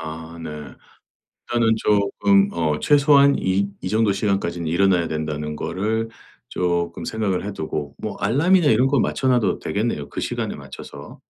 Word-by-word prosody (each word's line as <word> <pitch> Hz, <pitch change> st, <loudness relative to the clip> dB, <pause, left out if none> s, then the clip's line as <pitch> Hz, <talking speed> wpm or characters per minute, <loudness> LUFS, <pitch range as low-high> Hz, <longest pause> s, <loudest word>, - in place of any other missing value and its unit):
아 80 Hz, +1 st, -8 dB
네. 80 Hz, -, -6 dB, 1.0 s
일단은 115 Hz, -1 st, +3 dB
쪼끔 100 Hz, -1 st, +2 dB
어 80 Hz, -3 st, -1 dB
최소한 140 Hz, -1 st, +5 dB
이 95 Hz, +2 st, 0 dB
'이 -, -, -4 dB
정도 110 Hz, 0 st, +2 dB
시간까지는 95 Hz, -4 st, -1 dB
일어나야 90 Hz, 0 st, +2 dB
된다.'는 75 Hz, -1 st, -4 dB
거를 110 Hz, +7 st, -2 dB, 0.4 s
쪼끔 85 Hz, -1 st, -2 dB
생각을 100 Hz, -4 st, -2 dB
해 105 Hz, -, -4 dB
두고 75 Hz, -4 st, -5 dB
뭐 -, -, -5 dB
알람이나 150 Hz, -, +3 dB
이런 120 Hz, +4 st, +4 dB
거 135 Hz, -2 st, +2 dB
맞춰놔도 125 Hz, -7 st, +1 dB
되겠네요 100 Hz, -9 st, -2 dB
그 -, -, -6 dB
시간에 -, -, -3 dB
맞춰서. 70 Hz, -, -11 dB
100 Hz, 320 characters per minute, -22 LUFS, 85-115 Hz, 1.0 s, 최소한